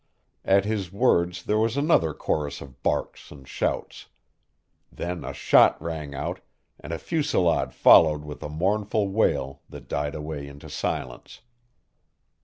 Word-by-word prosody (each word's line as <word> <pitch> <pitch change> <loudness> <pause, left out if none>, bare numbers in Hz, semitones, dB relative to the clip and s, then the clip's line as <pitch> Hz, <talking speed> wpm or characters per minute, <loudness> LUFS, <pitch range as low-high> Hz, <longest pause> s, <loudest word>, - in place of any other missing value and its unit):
At 100 0 +3
his 105 -4 -2
words 90 -5 +1
there 105 +1 +1
was 115 +4 0
another 140 - +3
chorus 75 -2 -2
of 70 -2 -13
barks - - -2
and 70 -2 -13
shouts. - - -3 0.8
Then 90 0 -5
a - - -5
shot - - +4
rang 80 -3 -5
out, - - -4 0.4
and 75 - -9
a 85 - -2
fusillade 145 - 0
followed 75 -2 +5
with 75 -1 -8
a - - -5
mournful 100 +5 0
wail 70 -10 0
that - - -11
died 75 0 -2
away 75 -2 -6
into 70 0 -11
silence. 60 -1 -5
85 Hz, 140 wpm, -25 LUFS, 75-100 Hz, 0.8 s, followed